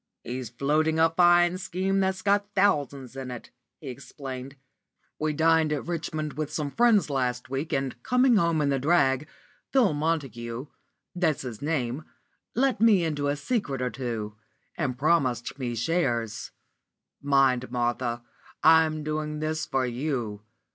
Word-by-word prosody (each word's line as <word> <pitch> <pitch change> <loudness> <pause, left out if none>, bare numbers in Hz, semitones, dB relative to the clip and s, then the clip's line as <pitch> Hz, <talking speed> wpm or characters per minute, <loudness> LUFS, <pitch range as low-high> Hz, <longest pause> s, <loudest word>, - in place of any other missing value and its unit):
"He's 125 -1 -5
floating 150 +6 +1
a 165 0 +4
fine 175 +1 +4
scheme 190 +2 -1
that's 190 -1 0
got 205 +1 +1
thousands 140 -9 +1
in 135 -1 -6
it," 125 -2 -8 0.3
he 145 - -8
explained. 135 0 -8 0.6
"We 155 0 0
dined 160 0 +3
at 150 -3 -2
Richmond 155 -3 -3
with 150 +2 -4
some 150 -2 -3
friends 220 -8 +3
last 125 -2 -2
week, 140 +4 -3
and, 135 -3 -2
coming 250 - +3
home 170 -4 +2
in 140 - +1
the 135 -1 +1
drag, 140 -2 +2 0.4
Phil 245 - +4
Montague 135 -6 -2 0.5
that's 165 -6 0
his 120 -4 -7
name 145 -2 -2 0.5
let 255 -3 +1
me 215 -6 +5
into 145 -3 -1
a 145 - +1
secret 145 - -2
or 125 -1 -1
two, 115 -4 -4 0.4
and 135 -6 -2
promised 135 -4 +1
me 120 -2 -3
shares. 120 -5 -1 0.7
Mind, 135 -3 +2
Martha, 120 0 -1 0.4
I'm 160 -1 +5
doing 150 0 -3
this 155 0 -2
for 135 -1 0
you. 120 -5 -3
145 Hz, 145 wpm, -27 LUFS, 130-165 Hz, 0.7 s, me